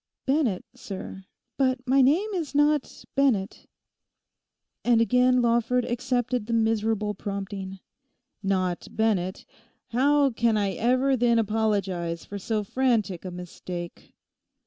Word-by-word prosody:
'Bennett, 265 - +1
sir; 190 -1 -8 0.3
but 260 -1 +1
my 270 +2 +4
name 345 +11 +3
is 320 -7 -3
not 295 -1 +1
Bennett.' 235 -8 0 1.2
And 240 -2 +4
again 250 +1 +3
Lawford 235 +1 +2
accepted 245 -2 -1
the 230 - -2
miserable 220 -2 +1
prompting. 195 -1 -5 0.6
'Not 185 -3 -1
Bennett!... 195 -5 -1 0.4
How 280 +3 +3
can 230 -1 +1
I 200 -2 +1
ever 255 +6 +2
then 235 -1 +3
apologise 200 -6 -1
for 205 - -7
so 215 +2 -1
frantic 215 -6 0
a - - -3
mistake? 175 -1 -8
225 Hz, 115 wpm, -26 LUFS, 195-255 Hz, 1.2 s, my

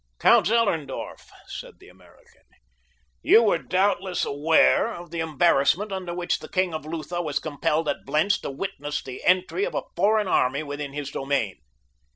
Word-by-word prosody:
"Count 220 - +5
Zellerndorf," 195 - -1 0.2
said - - -9
the - - -18
American, - - -22 0.8
"you 230 - +6
were 200 -6 +2
doubtless 185 +4 0
aware 160 +9 +3
of 175 -4 -9
the 170 - -4
embarrassment 160 +4 +2
under 185 -2 -4
which 175 0 -2
the - - -11
king 185 -2 0
of 155 -1 -6
Lutha 165 +2 -4
was 150 -4 -2
compelled 155 +1 -1
at - - -2
Blentz 190 +7 +1
to - - -6
witness 150 -1 -4
the 130 -1 -8
entry 185 - +2
of - - -3
a - - -1
foreign 210 +3 +2
army 140 -3 +1
within 145 -1 -6
his 145 -1 -5
domain. 135 -10 -2
165 Hz, 165 wpm, -24 LUFS, 145-190 Hz, 0.8 s, you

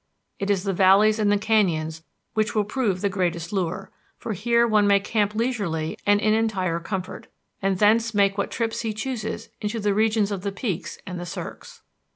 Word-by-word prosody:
It 200 - -2
is 195 -2 +1
the 195 -1 -1
valleys 200 +4 +5
and 205 -1 +3
the 205 - +4
canyons 170 -7 +1 0.3
which 215 -1 0
will 210 - +3
prove 210 -4 -1
the 205 - +2
greatest 175 -3 -2
lure, 190 0 -2 0.3
for 225 - -4
here 235 +4 +2
one 210 -2 +3
may 200 0 +5
camp 210 0 -1
leisurely 200 -10 -1
and 205 0 +5
in 215 +1 +2
entire 195 -6 0
comfort, 185 +1 -5 0.3
and 195 -1 +1
thence 225 +3 +3
make 200 -2 +2
what 200 - -1
trips 230 -1 -2
he 225 -2 -2
chooses 220 -1 -4
into 215 +2 -2
the 205 -1 +1
regions 215 0 +2
of 195 -2 -3
the 200 +1 -2
peaks 195 -3 -4
and 180 -2 -6
the 175 - -5
cirques. 470 - -8
205 Hz, 190 wpm, -24 LUFS, 190-220 Hz, 0.3 s, valleys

